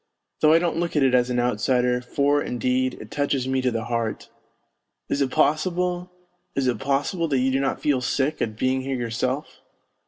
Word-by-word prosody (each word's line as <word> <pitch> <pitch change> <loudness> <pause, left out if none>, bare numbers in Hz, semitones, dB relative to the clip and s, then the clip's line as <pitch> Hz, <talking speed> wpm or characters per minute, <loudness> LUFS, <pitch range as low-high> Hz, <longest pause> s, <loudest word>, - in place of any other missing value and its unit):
Though 155 - +5
I 160 - +7
don't 170 -1 0
look 170 -1 -2
at 150 - +3
it 130 -1 +3
as 125 0 +3
an 125 0 0
outsider, 125 +1 +1
for, 140 +3 +1
indeed, 125 +1 0
it 110 - -11
touches 140 -3 0
me 130 0 0
to 130 - +2
the 115 -2 -2
heart.... 115 -1 -3 0.8
Is 140 - 0
it 135 - +2
possible, 180 +5 0 0.4
is 135 - 0
it 120 -4 0
possible 145 - 0
that 140 -3 +1
you 130 +1 +2
do 135 - +1
not 135 -1 -1
feel 140 -4 +1
sick 140 +4 -1
at 110 -2 -2
being 130 +2 +1
here 135 0 -3
yourself 125 +4 -3
130 Hz, 195 wpm, -24 LUFS, 125-145 Hz, 0.8 s, I